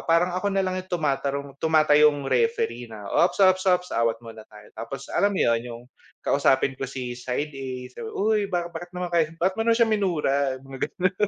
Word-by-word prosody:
parang 170 +2 +3
ako 205 - 0
na 195 - +1
lang 185 0 -2
yung - - -26
tumatarong 140 -3 -1
tumatayong 150 -2 +4
referee 125 - 0
na, 110 -2 -10
"Ops, 175 - +2
ops, 185 0 +3
ops, 180 0 +2
awat 115 -1 +1
muna 110 -1 -10
tayo." 105 -1 -15
Tapos 135 +4 -7
alam 200 0 +2
mo - - 0
yun, 115 -1 +2
yung 120 -1 -8 0.4
kausapin 135 -1 +2
ko, 135 - -4
si 125 -2 -5
side 130 +5 -3
A 135 -1 -5 0.2
sabi, 450 - -7
"Uy, 215 - +1
ba 175 -1 0
bakit 175 +1 -7
naman 180 0 -3
kayo 165 -2 +3
bakit 185 +2 +2
mo - - -3
naman 230 - +4
siya 230 -1 +3
minura?" 150 -10 +1
yung - - -19
mga 135 - -7
gano'n, 185 0 0
150 Hz, 210 wpm, -25 LUFS, 130-185 Hz, 0.4 s, tumatayong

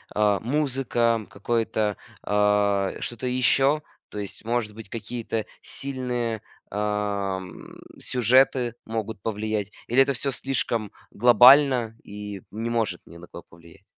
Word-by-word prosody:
э, 105 -2 +3
музыка, 120 -4 0
какое-то, 110 0 -1 0.3
а, 105 -1 +2
что-то 120 +1 -4
еще, 135 +4 +3 0.3
то 105 - -6
есть, 100 +2 -6
может 115 -3 -1
быть, 110 -3 -10
какие-то 115 -1 -4 0.2
сильные, 125 -5 -3 0.3
а, 105 -2 -1
м, 95 -1 -11 0.2
сюжеты 125 0 +3
могут 110 -3 -4
повлиять 105 -1 -2 0.2
или 125 +3 +4
это 140 +1 +3
всё 135 +3 -1
слишком 120 -5 -1 0.2
глобально 125 0 +6
и 105 -1 -8
не 115 +3 -3
может 110 -7 -1
ни 85 - -13
на 90 - -12
кого 85 - -11
повлиять. 85 -1 -18
110 Hz, 125 wpm, -25 LUFS, 105-125 Hz, 0.3 s, глобально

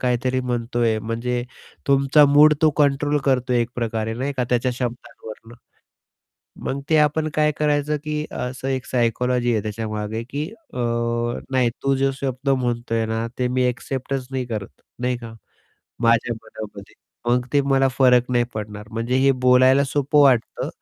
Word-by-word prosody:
काहीतरी 125 +1 0
म्हणतोय 120 -2 -1
म्हणजे 115 +3 -2 0.4
तुमचा 140 +2 +5
मूड 150 +2 +6
तो 155 - +6
कंट्रोल 145 +1 +2
करतोय 125 -2 +1
एकप्रकारे 115 -2 -2
नाही 135 +4 -2
का 125 - +1
त्याच्या 125 +1 +1
शब्दांवरून. 120 -2 -7 1.1
मग 135 - -2
ते 160 - +5
आपण 150 +1 +2
काय 150 0 +2
करायचं 150 0 +1
की 150 0 -2
असं 130 +1 -4
एक 130 -1 -2
सायकॉलॉजी 120 0 +1
आहे 110 -2 0
त्याच्यामागे 110 +1 -4
की 145 +2 -2 0.3
अ, - - -5 0.7
नाही 130 -3 +2
तू 135 0 +2
जो 135 +1 +2
शब्द 135 0 -3
म्हणतोय 120 -3 0
ना 115 +1 -2
ते 125 -1 +1
मी 130 +1 0
एक्सेप्टच 130 +1 -4
नाही 130 -1 -2
करत 105 - -6 0.2
नाही 125 0 0
का. 115 -2 -9 0.7
माझ्या 115 0 +2
मनामध्ये 105 -2 -10 0.4
मग 125 0 +1
ते 145 - +4
मला 135 0 +4
फरक 125 -2 +4
नाही 120 -1 +2
पडणार. 105 0 -6
म्हणजे 115 +3 -2
हे 135 +1 +4 0.2
बोलायला 130 +2 +5
सोपं 145 +1 +1
वाटतं, 130 -5 +2
125 Hz, 150 wpm, -22 LUFS, 115-135 Hz, 1.1 s, मूड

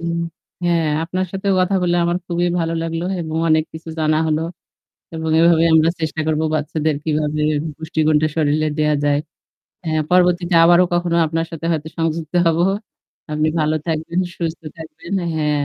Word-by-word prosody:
উম 170 0 -2 0.5
হ্যাঁ 170 -2 +2 0.2
আপনার 185 +3 -2
সাথেও 195 0 -1
কথা 185 +2 +1
বললে 175 -1 +2
আমার 175 +1 +1
খুবই 175 0 0
ভালো 165 0 -1
লাগলো 165 +1 -3 0.2
এবং 160 -1 -4
অনেক 155 0 +3
কিছু 160 +1 -10
জানা 155 -1 +2
হলো। 155 0 +1 0.7
এবং 160 0 -3
এভাবে 165 0 +5
আমরা 160 +1 +5
চেষ্টা 160 0 -2
করব 155 -1 +1 0.2
বাচ্চাদের 155 0 -1
কিভাবে 150 -1 -1 0.4
পুষ্টিগুণটা 155 -1 +1
শরীলে 155 0 +1
দেয়া 150 0 +2
যায়। 145 0 +2 0.7
হ্যাঁ 155 -1 0
পরবর্তীতে 180 -1 +3
আবারো 175 +1 +6
কখনো 175 -1 +1
আপনার 165 +1 -2
সাথে 165 0 -5
হয়তো 160 -1 -3
সংযুক্ত 165 0 -2
হব। 165 -1 +3 0.7
আপনি 155 +1 +1
ভালো 155 0 +1
থাকবেন, 165 +2 -1 0.2
সুস্থ 165 -1 -3 0.2
থাকবেন। 160 +2 -10 0.2
হ্যাঁ। 150 -2 0
160 Hz, 155 wpm, -19 LUFS, 155-170 Hz, 0.7 s, আবারো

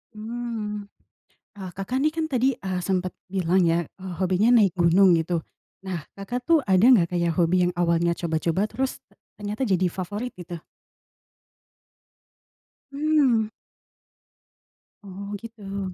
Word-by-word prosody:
Hmm. 215 -2 -5 0.7
Ah, 185 -3 -7
Kakak 195 +7 -3
ini 295 +3 +3
kan 325 -1 -1
tadi, 260 0 +2
eee, 185 -4 -4
sempet 185 -2 -1
bilang 185 -1 +1
ya, 165 +1 +2
eee, 190 -1 -9
hobinya 190 +6 +3
naik 190 -2 +1
gunung, 175 +1 +5
gitu. 165 +1 -1 0.4
Nah, 180 -6 -5
Kakak 245 +6 -5
tuh 330 -2 +5
ada 190 +3 +5
nggak 220 -10 +6
kayak 170 -1 +1
hobi 175 +2 +3
yang 180 - -1
awalnya 170 0 +2
coba-coba 170 +4 -1
terus 265 0 -3 0.4
ternyata 210 +5 -3
jadi 185 -3 +2
favorit, 205 +7 -5
gitu? 175 -1 -7 2.3
Hmm. 280 -6 +2 1.6
Oh, 200 +1 -8
gitu. 200 -4 -6
195 Hz, 125 wpm, -25 LUFS, 175-225 Hz, 2.3 s, nggak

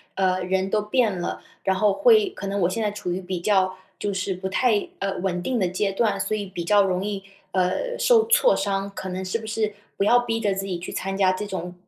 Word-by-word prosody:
呃， 185 -1 +1
人 190 +1 0
都 210 +1 +1
变 210 -3 +1
了， 175 - -4 0.2
然 190 - +2
后 205 +2 +3
会 435 - +5
可 200 - -7
能 200 +1 -1
我 175 - +3
现 225 +5 -2
在 210 -1 0
处 205 -3 -4
于 180 +2 -2
比 180 -1 -4
较 190 -1 +2 0.2
就 205 - -2
是 190 0 -1
不 185 +1 -5
太， 215 +1 +2
呃， 195 0 -2
稳 180 -1 -1
定 250 +4 0
的 185 - +2
阶 195 +3 -1
段， 200 0 +1
所 195 +2 -1
以 205 -1 -3
比 180 -3 -6
较 205 +4 +4
容 185 -1 0
易， 205 -1 -3 0.3
呃， 190 - 0
受 460 -3 +5
挫 - - +5
伤。 195 0 -1
可 190 - -5
能 185 +1 -4
是 185 +4 -1
不 220 - -9
是， 215 -1 -1 0.2
不 - - +1
要 245 +3 +6
逼 230 -2 -1
着 205 -3 +1
自 195 0 -3
己 180 -3 -3
去 175 - -7
参 195 0 -3
加 190 -1 +3
这 185 - -4
种 180 -3 -5
195 Hz, 270 characters per minute, -24 LUFS, 185-215 Hz, 0.3 s, 要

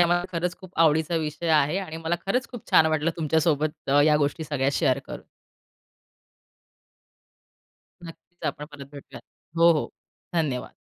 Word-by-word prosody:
हा 175 - +6
माझ्या 175 +1 +1
खरंच 175 +1 -2
खूप 185 -2 -12
आवडीचा 160 +1 +3
विषय 160 +1 -3
आहे 150 +7 0
आणि 160 -5 -6
मला 165 +1 -2
खरंच 250 +6 0
खूप 245 -3 -10
छान 160 - +6
वाटलं 155 +1 +1
तुमच्या 160 0 +1
सोबत 155 -3 -1
अ, 145 - +5
या 150 -1 +4
गोष्टी 150 +2 -1
सगळ्या 140 -2 -1
शेअर - - +1
करून. - - -9 2.8
नक्कीच 175 +1 -13
आपण 150 - -3
परत 140 -2 -10
भेटूयात. 140 - -11 0.3
हो, 170 0 +6
हो 155 - -1 0.5
धन्यवाद. 140 -7 -1
160 Hz, 155 wpm, -25 LUFS, 150-170 Hz, 2.8 s, हा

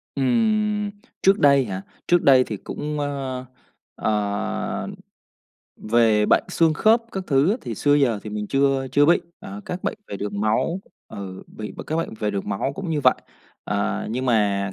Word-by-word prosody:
Ừm, 210 - +1 0.3
trước 195 +1 +4
đây 140 -2 +5
hả? 95 -3 -4 0.3
Trước 175 -1 +4
đây 130 -2 +7
thì 110 -4 -5
cũng, 150 +8 -5
ơ, 135 -3 -3 0.5
ờ, 105 -1 -2 0.9
về 110 -2 +3
bệnh - - +4
xương 165 -2 +2
khớp 225 +8 +4
các 190 -1 -4
thứ 140 +4 +3
á, 215 - +1
thì 115 - -5
xưa 145 +7 +3
giờ 130 -7 +2
thì 105 - -7
mình 105 0 -4
chưa 135 +1 +1
chưa 145 0 +5
bị, 170 - +5 0.2
ờ, 100 +2 -8
các 180 +1 -5
bệnh - - -2
về - - -5
đường 100 0 -4
máu 110 - +1 0.3
ừ, 95 -2 -8
bị 105 -1 -8
b - - -6
các 155 - -1
bệnh 165 -8 -2
về 105 - 0
đường 100 -1 -4
máu 100 +7 -1
cũng 185 +1 -5
như 155 -2 0
vậy. - - +5 0.5
À, 100 0 -1
nhưng 130 +3 -2
mà 100 -4 +1
130 Hz, 185 wpm, -23 LUFS, 105-155 Hz, 0.9 s, đây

